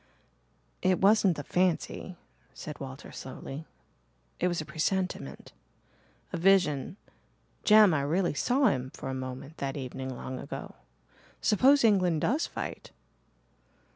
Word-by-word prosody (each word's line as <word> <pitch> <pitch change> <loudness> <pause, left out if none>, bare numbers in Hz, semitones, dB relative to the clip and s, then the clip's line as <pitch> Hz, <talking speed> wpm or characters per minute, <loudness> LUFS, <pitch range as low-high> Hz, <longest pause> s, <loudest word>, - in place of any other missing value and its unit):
"It 185 -1 +3
wasn't 195 -3 +4
a 145 - -4
fancy," 180 +2 -1 0.4
said 150 - -8
Walter 135 0 -8
slowly. 135 +3 -8 0.7
"It - - +2
was 175 -1 -1
a 155 - -4
presentiment 185 +4 -3 0.8
a - - -1
vision 175 -4 +2 0.7
Jem, 210 -4 +7
I 145 - +1
really 170 +5 +1
saw 255 - +2
him 130 -1 -2
for 135 - -6
a - - -3
moment 130 +3 -6
that 135 0 -3
evening 130 0 -5
long 130 0 -6
ago. - - -7 0.7
Suppose 270 +6 +4
England 180 -8 +3
does 285 +8 +1
fight?" - - -6
165 Hz, 125 wpm, -29 LUFS, 135-195 Hz, 0.8 s, Jem